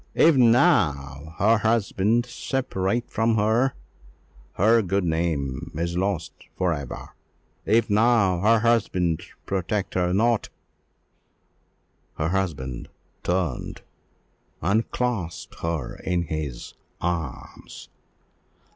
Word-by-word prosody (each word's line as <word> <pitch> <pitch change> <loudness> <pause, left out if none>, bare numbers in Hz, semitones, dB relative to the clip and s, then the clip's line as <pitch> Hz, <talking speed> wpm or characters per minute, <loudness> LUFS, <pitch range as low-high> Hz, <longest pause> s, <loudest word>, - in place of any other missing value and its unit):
If 165 -1 +6
now 80 - +3
her 110 +3 +4
husband 110 +1 +1
separate 120 -3 -2
from 115 +1 +1
her, 110 +5 +2 0.8
her 115 +4 +4
good 95 0 0
name 80 -6 -2
is 85 +2 -2
lost 95 -2 -1 0.2
for 90 -2 +1
ever! 70 -5 -6 0.6
If 115 +3 +3
now 105 -4 +3
her 110 +4 +4
husband 95 -8 +1 0.2
protect 95 +1 -2
her 90 -1 +1
not 115 +4 +2 0.9
" - - -44
Her 80 +1 0
husband 75 -10 -3 0.3
turned, 90 0 -2 0.8
and 100 +7 +1
clasped 115 -9 -3
her 80 -6 -3
in 90 -1 -1
his 75 -6 -5 0.3
arms. 85 -6 -5
95 Hz, 100 wpm, -24 LUFS, 85-115 Hz, 0.9 s, If